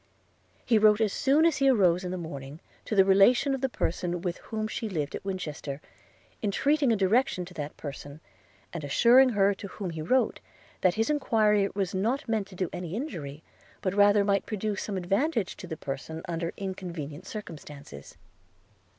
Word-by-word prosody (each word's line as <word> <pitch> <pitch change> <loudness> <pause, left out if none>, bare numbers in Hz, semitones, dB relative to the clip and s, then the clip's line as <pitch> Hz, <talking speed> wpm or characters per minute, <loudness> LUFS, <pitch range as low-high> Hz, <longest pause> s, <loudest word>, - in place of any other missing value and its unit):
He 225 -3 +4
wrote 210 0 +5
as 215 -3 +1
soon 285 +4 +3
as 335 - +3
he 275 -1 +4
arose 185 -7 +3
in 180 - -3
the 185 - -3
morning 145 -3 -7 0.3
to 215 - -2
the 195 -1 +6
relation 200 +8 +5
of 270 - -3
the 265 - +1
person 175 -5 -2
with 175 -1 -3
whom 215 -1 -2
she 220 0 -4
lived 150 -6 -3
at - - -5
Winchester, 155 -7 -5 0.6
entreating 275 +6 +2
a - - +4
direction 195 -1 +1
to 180 - -12
that 150 -3 -6
person, 145 0 -8 0.5
and 170 -3 -5
assuring 245 - +5
her 200 -3 +3
to 200 - -8
whom 190 -2 -6
he 160 -1 -5
wrote, 255 +12 +1 0.4
that 185 -2 +3
his 225 +6 +1
enquiry 215 -8 +2
was 195 -2 -1
not 235 +10 -1
meant 220 -3 -1
to 195 - -13
do 185 0 -1
any 180 0 -5
injury, 165 - -6 0.4
but 185 - -2
rather 205 0 +5
might 200 -1 +1
produce 215 -1 -2
some 200 -2 -3
advantage 200 - 0
to - - -9
the 160 - -5
person 145 +4 -6
under 170 0 -2
inconvenient 180 -4 -6
circumstances. 150 - -9
195 Hz, 180 wpm, -28 LUFS, 170-220 Hz, 0.6 s, the